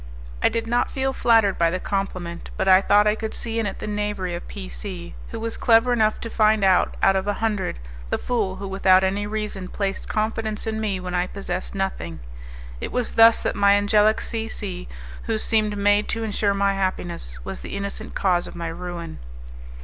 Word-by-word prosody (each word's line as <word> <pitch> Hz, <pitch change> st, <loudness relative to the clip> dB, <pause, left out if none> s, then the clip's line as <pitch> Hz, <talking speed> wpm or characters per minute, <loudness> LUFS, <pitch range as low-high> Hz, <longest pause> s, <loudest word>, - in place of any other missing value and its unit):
I -, -, +4 dB
did 230 Hz, 0 st, -2 dB
not 240 Hz, +1 st, +1 dB
feel 265 Hz, 0 st, -1 dB
flattered 225 Hz, -6 st, +3 dB
by 170 Hz, -1 st, +4 dB
the 185 Hz, +2 st, -2 dB
compliment, 185 Hz, -4 st, -4 dB
but -, -, 0 dB
I 190 Hz, 0 st, +7 dB
thought 205 Hz, +1 st, +4 dB
I 210 Hz, -, +4 dB
could 220 Hz, 0 st, -4 dB
see 230 Hz, -1 st, -3 dB
in 220 Hz, -, 0 dB
it 195 Hz, -, -5 dB
the -, -, -6 dB
knavery 205 Hz, -3 st, -2 dB
of 170 Hz, -, -6 dB
P 60 Hz, -, -7 dB
C, -, -, -7 dB, 0.2 s
who -, -, -6 dB
was 230 Hz, 0 st, -3 dB
clever 235 Hz, +1 st, +4 dB
enough 215 Hz, -2 st, +2 dB
to 230 Hz, -, -5 dB
find 215 Hz, -1 st, +3 dB
out, 190 Hz, -2 st, +3 dB
out 195 Hz, -, +5 dB
of 190 Hz, +1 st, -1 dB
a 205 Hz, -, +1 dB
hundred, 210 Hz, -, -1 dB, 0.3 s
the -, -, 0 dB
fool 215 Hz, -7 st, -1 dB
who 195 Hz, -, -6 dB
without 190 Hz, -1 st, +4 dB
any 200 Hz, +2 st, 0 dB
reason 210 Hz, -3 st, -4 dB
placed 195 Hz, 0 st, -3 dB
confidence 220 Hz, 0 st, -2 dB
in 220 Hz, 0 st, -2 dB
me 200 Hz, -3 st, -1 dB
when 180 Hz, 0 st, -5 dB
I 180 Hz, 0 st, +1 dB
possessed 185 Hz, -1 st, -5 dB
nothing. 85 Hz, -, -3 dB, 0.6 s
It -, -, -5 dB
was 250 Hz, -2 st, -1 dB
thus 225 Hz, 0 st, +6 dB
that -, -, -1 dB
my 200 Hz, 0 st, +5 dB
angelic 210 Hz, +1 st, +3 dB
C 225 Hz, -1 st, -3 dB
C, 185 Hz, -5 st, -5 dB, 0.4 s
who 225 Hz, -1 st, 0 dB
seemed 215 Hz, -1 st, +1 dB
made 205 Hz, +1 st, +3 dB
to 225 Hz, -, -2 dB
insure 205 Hz, -2 st, 0 dB
my 200 Hz, 0 st, +2 dB
happiness, 175 Hz, -, -2 dB
was -, -, -5 dB
the 65 Hz, -, -6 dB
innocent 200 Hz, 0 st, -5 dB
cause 180 Hz, -3 st, +1 dB
of -, -, -10 dB
my 170 Hz, -1 st, -4 dB
ruin. 170 Hz, -, -6 dB
200 Hz, 205 wpm, -23 LUFS, 185-220 Hz, 0.6 s, I